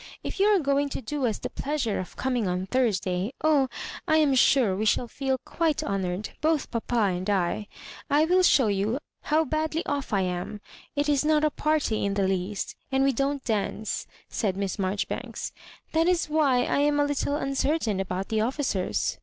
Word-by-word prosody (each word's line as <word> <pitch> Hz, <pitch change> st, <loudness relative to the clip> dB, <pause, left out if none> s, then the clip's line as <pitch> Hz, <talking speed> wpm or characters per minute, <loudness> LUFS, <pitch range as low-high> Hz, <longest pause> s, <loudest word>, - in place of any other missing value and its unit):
If -, -, -5 dB
you 400 Hz, -, +5 dB
are 420 Hz, -1 st, +5 dB
going 280 Hz, -3 st, +1 dB
to 270 Hz, -, -4 dB
do 275 Hz, +2 st, -1 dB
us 220 Hz, -, -1 dB
the -, -, -6 dB
pleasure 275 Hz, -7 st, -1 dB
of 185 Hz, -, -7 dB
coming 250 Hz, -5 st, 0 dB
on 180 Hz, +1 st, -1 dB
Thursday 195 Hz, -3 st, 0 dB
— -, -, -21 dB
^Oh, 290 Hz, -4 st, +4 dB, 0.4 s
I 315 Hz, -, +4 dB
am 300 Hz, -3 st, +4 dB
sure 250 Hz, -5 st, +4 dB
we 205 Hz, -, -1 dB
shall 220 Hz, +3 st, +2 dB
feel 265 Hz, +2 st, -1 dB
quite 325 Hz, -3 st, 0 dB
honoured, 190 Hz, 0 st, -2 dB
both 315 Hz, -1 st, +1 dB
papa 235 Hz, +1 st, -2 dB
and 185 Hz, -1 st, 0 dB
I 200 Hz, +1 st, 0 dB, 0.2 s
— -, -, -15 dB
^I 300 Hz, +2 st, +4 dB
will 365 Hz, +2 st, +4 dB
show 285 Hz, -7 st, +5 dB
you 205 Hz, +3 st, 0 dB, 0.2 s
how 315 Hz, +2 st, +2 dB
badly 315 Hz, +2 st, -1 dB
off 285 Hz, -2 st, -2 dB
I 200 Hz, -2 st, +2 dB
am. 180 Hz, +3 st, -3 dB, 0.4 s
It 290 Hz, 0 st, +1 dB
is 290 Hz, -1 st, +2 dB
not 305 Hz, 0 st, +3 dB
a 305 Hz, -, +2 dB
party 300 Hz, -8 st, 0 dB
in 200 Hz, 0 st, 0 dB
the 195 Hz, -1 st, +2 dB
least, 190 Hz, +2 st, -2 dB, 0.2 s
and 265 Hz, 0 st, +3 dB
we 275 Hz, 0 st, +3 dB
don't 275 Hz, +2 st, -1 dB
dance," 215 Hz, -1 st, -2 dB, 0.2 s
said 195 Hz, -4 st, -1 dB
Miss 200 Hz, -1 st, -2 dB
Marjori 195 Hz, 0 st, -1 dB
banks, -, -, -5 dB, 0.4 s
*'that 325 Hz, +1 st, +2 dB
is 360 Hz, -1 st, +2 dB
why 290 Hz, -5 st, +2 dB
I -, -, 0 dB
am 290 Hz, 0 st, +3 dB
a. 290 Hz, -, +4 dB
little 285 Hz, 0 st, -1 dB
uncertain 275 Hz, -6 st, 0 dB
about 190 Hz, 0 st, -3 dB
the 220 Hz, -1 st, +1 dB
officers. 235 Hz, -6 st, -1 dB
260 Hz, 200 wpm, -26 LUFS, 200-295 Hz, 0.4 s, you